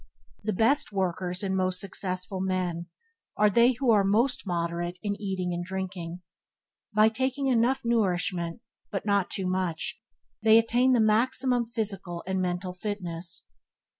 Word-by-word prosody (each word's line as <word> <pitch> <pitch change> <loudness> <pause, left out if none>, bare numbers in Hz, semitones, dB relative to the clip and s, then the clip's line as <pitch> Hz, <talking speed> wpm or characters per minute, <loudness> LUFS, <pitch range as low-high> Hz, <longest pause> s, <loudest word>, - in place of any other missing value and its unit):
The 215 - 0
best 230 +8 +2
workers 185 -1 -1
and 190 -1 -1
most 185 -1 +1
successful 185 -1 -1
men 180 -2 -2 0.5
are 210 0 +4
they 235 +5 +5
who 250 0 +1
are 205 -3 +5
most 220 +4 +1
moderate 175 0 -2
in 205 -1 -1
eating 185 -3 -2
and 175 0 -3
drinking. 180 -2 -5 0.7
By 215 +1 +5
taking 260 +4 -1
enough 250 0 +2
nourishment, 180 -5 0 0.3
but 195 - -3
not 200 -3 +2
too 190 - -3
much, 185 -3 -2 0.4
they 220 0 +6
attain 240 +3 +3
the 245 - +4
maximum 240 +3 +2
physical 195 -7 -4
and 190 0 -1
mental 180 0 -2
fitness. 180 -4 -4
190 Hz, 140 wpm, -27 LUFS, 180-225 Hz, 0.7 s, they